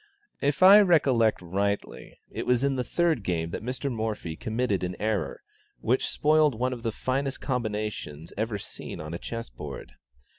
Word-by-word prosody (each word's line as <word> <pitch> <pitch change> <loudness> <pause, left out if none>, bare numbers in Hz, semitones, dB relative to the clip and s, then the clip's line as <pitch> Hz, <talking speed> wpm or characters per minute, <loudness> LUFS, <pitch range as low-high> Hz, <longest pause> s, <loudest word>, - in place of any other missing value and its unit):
If 145 +5 +1
I 195 +3 +10
recollect 135 - +3
rightly, 100 +3 -3
it - - -5
was 125 +1 +3
in 140 -1 +2
the 125 - 0
third 165 -1 +1
game 85 -3 -2
that - - -4
Mr. 130 +4 -3
Morphy 110 -8 -3
committed 110 -1 -1
an 90 0 -2
error, 110 -1 -2 0.4
which 125 +3 +1
spoiled 155 -3 +3
one 125 +3 0
of 120 - -7
the 115 -1 -1
finest 135 +4 -2
combinations 105 - -3
ever 110 0 -1
seen 100 - -8
on 75 +1 -6
a 85 - -4
chess 115 - -6
board. - - -8
115 Hz, 170 wpm, -27 LUFS, 100-135 Hz, 0.4 s, I